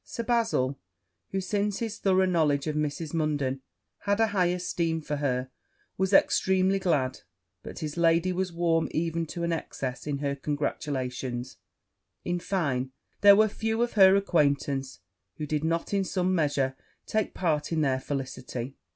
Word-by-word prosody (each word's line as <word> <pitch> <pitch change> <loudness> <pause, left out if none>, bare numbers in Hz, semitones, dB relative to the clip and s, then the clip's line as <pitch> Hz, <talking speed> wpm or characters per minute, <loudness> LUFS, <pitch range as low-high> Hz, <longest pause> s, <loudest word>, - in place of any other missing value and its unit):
Sir 235 - -5
Bazil, 225 - +1 0.5
who, 195 - -2
since 200 +1 -1
his 225 -3 -4
thorough 190 -1 +3
knowledge 155 -6 +2
of 155 -1 -2
Mrs. 150 +1 -2
Munden, 145 -4 -1 0.4
had 200 +1 0
a 225 - +5
high 190 -3 +2
esteem 175 -2 -1
of 160 - -9
her, 130 -2 -1 0.4
was 190 0 0
extremely 190 0 +3
glad; 145 -9 0 0.4
but - - -9
his 155 -1 -5
lady 170 +2 +3
was 185 0 -1
warm 165 -1 +1
even 165 0 -1
to 170 +2 -5
an 170 0 0
excess 135 -4 -5
in 145 -1 -1
her 140 0 -2
congratulations: 130 -3 -3 0.7
in 175 0 -1
fine, 140 -9 -1 0.3
there 200 0 +9
were 215 +1 +5
few 225 +2 -1
of 240 - -2
her 190 -2 +7
acquaintance 140 -7 0 0.4
who 155 - -3
did 150 0 -1
not 165 +4 -1
in 200 -1 +2
some 185 0 0
measure 145 -5 +1 0.3
take 215 -2 -1
part 155 -4 0
in 160 -2 +1
her 130 -2 +1
felicity. 130 -1 -5
165 Hz, 160 wpm, -28 LUFS, 140-190 Hz, 0.7 s, there